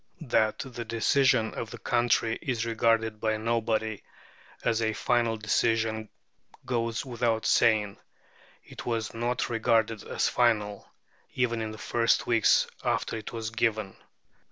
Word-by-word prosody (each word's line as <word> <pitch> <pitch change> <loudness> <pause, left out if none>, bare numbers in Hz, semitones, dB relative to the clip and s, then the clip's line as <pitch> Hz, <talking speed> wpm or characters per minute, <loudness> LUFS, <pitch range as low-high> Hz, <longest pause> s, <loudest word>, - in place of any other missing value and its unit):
That 110 -1 +2
the 120 -2 -6
decision 115 0 +2
of 115 - -5
the - - -8
country 120 -2 +1
is 120 -4 -2
regarded 110 -1 +1
by 110 -1 +1
nobody 110 -1 -1 0.6
as 115 0 +1
a 110 -1 +1
final 115 -1 +1
decision 110 +1 0 0.6
goes 115 -1 -1
without 120 -3 -1
saying. 105 -3 +3 0.7
It - - -10
was 115 -3 -2
not 120 +2 -1
regarded 115 -2 +1
as - - 0
final, 105 -4 +1 0.5
even 120 -3 0
in 110 - -3
the 110 - -8
first 115 +2 +1
weeks 115 -2 +4 0.2
after - - -1
it 110 -2 -6
was 115 -1 -4
given. 110 -4 -1
115 Hz, 130 wpm, -28 LUFS, 110-120 Hz, 0.7 s, weeks